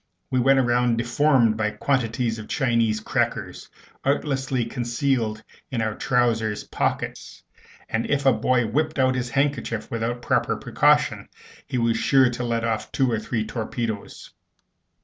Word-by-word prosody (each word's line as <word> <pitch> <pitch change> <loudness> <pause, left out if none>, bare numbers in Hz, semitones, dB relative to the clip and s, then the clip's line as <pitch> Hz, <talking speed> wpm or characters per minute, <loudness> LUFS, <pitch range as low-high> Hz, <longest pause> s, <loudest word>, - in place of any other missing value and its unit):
We 130 - +2
went 135 +2 +4
round 120 -1 +2
deformed 120 -1 +3
by 105 -1 +1
quantities 115 0 -1
of 110 - -8
Chinese 115 -6 +1
crackers 110 - -2 0.3
artlessly 135 -3 0
concealed 120 -2 -1 0.3
in 130 -5 -3
our 110 -1 0
trousers 115 -4 0
pockets; - - -3 0.4
and 110 +1 -2
if 140 -1 0
a 135 - +6
boy 125 +2 +1
whipped 155 +8 -1
out 130 -1 +3
his 125 -1 -2
handkerchief 120 -4 -1
without 120 +1 -3
proper - - +1
precaution, - - +2 0.4
he - - -2
was 115 -1 +1
sure 130 -3 +4
to 125 0 -4
let 115 -1 -1
off 115 -1 -2
two 130 -3 +1
or 110 - 0
three 110 0 -2
torpedoes. 115 -1 -5
120 Hz, 145 wpm, -24 LUFS, 115-130 Hz, 0.4 s, a